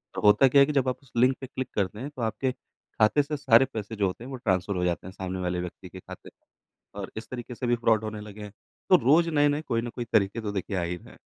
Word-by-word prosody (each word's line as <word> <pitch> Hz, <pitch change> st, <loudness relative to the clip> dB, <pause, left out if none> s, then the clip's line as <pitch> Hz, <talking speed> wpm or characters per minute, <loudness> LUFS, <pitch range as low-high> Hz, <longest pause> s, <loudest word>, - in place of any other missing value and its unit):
तो -, -, -3 dB
होता 105 Hz, +6 st, +6 dB
क्या 140 Hz, +2 st, +6 dB
है -, -, +7 dB
कि 150 Hz, -, -3 dB
जब 135 Hz, -2 st, +2 dB
आप 125 Hz, -, -2 dB
उस 135 Hz, -, -22 dB
लिंक 125 Hz, +2 st, +4 dB
पे 130 Hz, -, -6 dB
क्लिक 130 Hz, 0 st, -5 dB
करते 100 Hz, +1 st, -1 dB
हैं 135 Hz, +4 st, -5 dB
तो 125 Hz, -, -6 dB
आपके 115 Hz, +4 st, -1 dB
खाते 125 Hz, +1 st, -1 dB
से 150 Hz, +1 st, -4 dB
सारे 130 Hz, -2 st, +5 dB
पैसे 110 Hz, 0 st, -5 dB
जो 100 Hz, -2 st, +1 dB
होते 95 Hz, +5 st, -6 dB
हैं 125 Hz, -, -8 dB
वो 130 Hz, -, -5 dB
ट्रांसफर 95 Hz, -4 st, 0 dB
हो 90 Hz, -, -1 dB
जाते 90 Hz, 0 st, -2 dB
हैं -, -, -8 dB
सामने 95 Hz, -1 st, -5 dB
वाले 90 Hz, 0 st, -1 dB
व्यक्ति 90 Hz, +1 st, -8 dB
के 95 Hz, -, -10 dB
खाते -, -, -11 dB
में 100 Hz, -, -16 dB
और 95 Hz, -, -7 dB
इस 110 Hz, -, -7 dB
तरीके 125 Hz, -1 st, -7 dB
से 125 Hz, -, -3 dB
भी 120 Hz, -, +3 dB
फ्रॉड 115 Hz, -2 st, +2 dB
होने 110 Hz, -1 st, -5 dB
लगे 105 Hz, 0 st, -10 dB
हैं। 105 Hz, -, -8 dB, 0.4 s
तो -, -, +8 dB
रोज़ 165 Hz, +5 st, +5 dB
नए-नए 145 Hz, 0 st, +2 dB
कोई 115 Hz, -7 st, -1 dB
न 120 Hz, -, -4 dB
कोई 120 Hz, -, -4 dB
तरीके 100 Hz, +3 st, +2 dB
तो 105 Hz, -2 st, -3 dB
देखिए 100 Hz, 0 st, -3 dB
आ -, -, 0 dB
ही 85 Hz, +1 st, -2 dB
रहे -, -, -15 dB
हैं। -, -, -17 dB
115 Hz, 290 wpm, -27 LUFS, 100-130 Hz, 0.4 s, तो